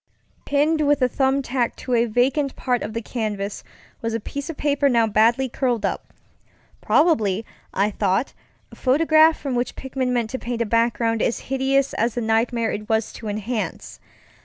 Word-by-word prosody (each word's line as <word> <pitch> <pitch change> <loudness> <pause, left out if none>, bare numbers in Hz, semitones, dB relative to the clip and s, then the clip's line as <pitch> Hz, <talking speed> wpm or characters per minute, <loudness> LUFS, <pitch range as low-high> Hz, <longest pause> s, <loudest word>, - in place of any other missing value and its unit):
Pinned 300 +2 +2
with 290 -2 +2
a - - +5
thumb 270 +2 +1
tack 245 -2 -1
to 255 - -4
a 235 0 +3
vacant 260 +5 +1
part 250 -2 -1
of 215 - -5
the 230 0 -4
canvas 210 -4 -4 0.4
was 230 -1 -2
a - - -1
piece 280 +7 -6
of 325 - -6
paper 285 -1 +2
now 235 -3 +3
badly 225 +5 +3
curled 245 -3 -1 1.0
upŌĆöprobably, 225 - +2 0.3
I 200 +2 +1
thought, 200 +4 0 0.4
a - - -12
photograph 315 +4 +4
from 275 -3 -3
which 245 0 -1
Pickman 265 -1 -3
meant 235 -3 -1
to 260 - -3
paint 235 -1 -2
a - - -5
background 230 0 +1
as 235 - +1 0.2
hideous 270 +1 +1
as 230 +1 0
the 240 - -1
nightmare 225 +1 +1
it 210 0 -6
was 220 -1 0
to 225 - -8
enhance. 215 +2 -4
240 Hz, 175 wpm, -22 LUFS, 225-270 Hz, 1.0 s, a